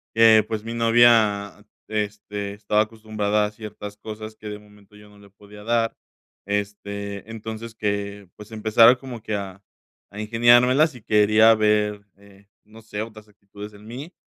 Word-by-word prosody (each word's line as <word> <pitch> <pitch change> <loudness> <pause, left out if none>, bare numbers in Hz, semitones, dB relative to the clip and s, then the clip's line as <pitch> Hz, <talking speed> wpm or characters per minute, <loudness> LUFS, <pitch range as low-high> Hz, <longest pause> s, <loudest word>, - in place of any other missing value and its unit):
que, 110 -1 +6
pues, 110 -1 -4
mi 115 +1 -6
novia, 115 -4 +3 0.3
este, 105 -1 -4
estaba 105 +1 +1
acostumbrada 110 -1 -2
a 105 - -2
ciertas 105 -1 -9
cosas 110 0 -9
que 105 - -9
de 105 0 -6
momento 105 -1 -21
yo 105 0 -16
no 105 0 -19
le 100 0 -17
podía 105 +1 -15
dar, 115 -1 +1 0.5
este, 100 0 -5
entonces 110 +1 -8
que, 100 -2 -4
pues, 105 +2 -12
empezara 110 +2 +5
como 125 -3 -9
que 105 - -3
a 100 -1 -6 0.5
a 105 - -8
ingeniármelas 120 +6 +4
y 125 - -12
quería 110 +1 +5
ver, 105 -1 +1
eh, 100 0 -21 0.2
no 110 +2 -16
sé, 105 -1 -6
otras 110 -1 -9
actitudes 105 0 -12
en 105 +1 -16
mí. 135 +10 -9
105 Hz, 160 wpm, -23 LUFS, 105-110 Hz, 0.5 s, que